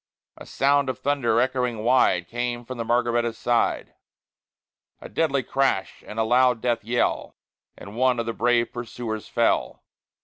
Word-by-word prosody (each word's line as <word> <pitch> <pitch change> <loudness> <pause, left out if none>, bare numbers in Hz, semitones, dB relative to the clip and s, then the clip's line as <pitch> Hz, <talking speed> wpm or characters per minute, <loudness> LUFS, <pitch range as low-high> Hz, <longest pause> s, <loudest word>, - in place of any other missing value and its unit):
A - - -12
sound 140 0 +2
of 130 - -3
thunder, 130 -5 +1
echoing 125 -3 -1
wide, 115 -8 +3
Came 120 0 -3
from 130 0 -7
the - - -1
Margaretta's 120 -1 0
side; 120 -1 0 1.1
A - - -9
deadly 140 -5 0
crash, 135 -9 -1
and 105 - -9
a 110 - +2
loud 125 +1 +3
death 120 -1 -1
yell, 120 +3 -1 0.4
And 100 +2 -11
one 125 0 +2
of 115 - -1
the 115 - -3
brave 120 0 +1
pursuers 115 -2 -5
fell. - - 0
120 Hz, 150 wpm, -24 LUFS, 115-130 Hz, 1.1 s, wide